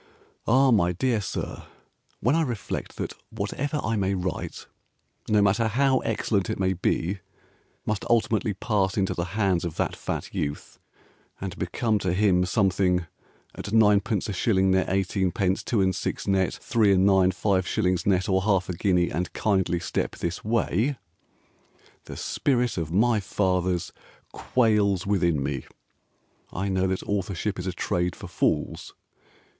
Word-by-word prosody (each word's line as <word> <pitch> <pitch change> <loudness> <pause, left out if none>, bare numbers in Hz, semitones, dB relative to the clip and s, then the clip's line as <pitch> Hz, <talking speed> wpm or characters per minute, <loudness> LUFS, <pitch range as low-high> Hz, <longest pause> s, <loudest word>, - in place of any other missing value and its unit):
Ah, 130 +3 +5
my 90 -6 +3
dear 115 +4 0
Sir, 95 - -5 0.5
When 125 +7 +3
I 165 - +3
reflect 120 -10 -4
that - - -3 0.2
whatever 130 +8 -3
I 115 - 0
may 100 -1 0
write, 90 -2 -4 0.6
No 105 -1 +4
matter 105 +3 +3
how 130 +4 +2
excellent 100 -5 -1
it - - -3
may 95 0 +2
be, 95 +1 -1 0.7
Must 105 -2 -1
ultimately 110 -3 +1
pass 100 -2 0
into 95 -2 +1
the 85 +3 -4
hands 95 -5 +2
Of 85 -3 -4
that - - -1
fat - - -5
youth 75 0 -4 0.6
And - - -5
become 110 -3 0
to 95 -3 -1
him 90 -2 +3
Something 90 -2 +2 0.5
At - - -8
ninepenceashillingneteighteenpencetwoandsix 95 -2 +1
netthreeandninefiveshillingsnetorhalfaguinea 95 -2 +2
andkindlystepthisway 95 - -1 1.1
The - - -8
spirit 125 -6 0
of 80 -1 -4
my 110 +4 +3
fathers 90 -3 0 0.4
quails 105 -6 +1
within 85 -8 +1
me, 70 -2 -3 0.9
I 95 +2 -2
know 95 0 +1
that 95 0 -2
authorship 100 0 -2
Is 90 - -4
a - - 0
trade 90 0 -1
for - - -9
fools. - - -1
95 Hz, 110 wpm, -26 LUFS, 90-110 Hz, 1.1 s, Ah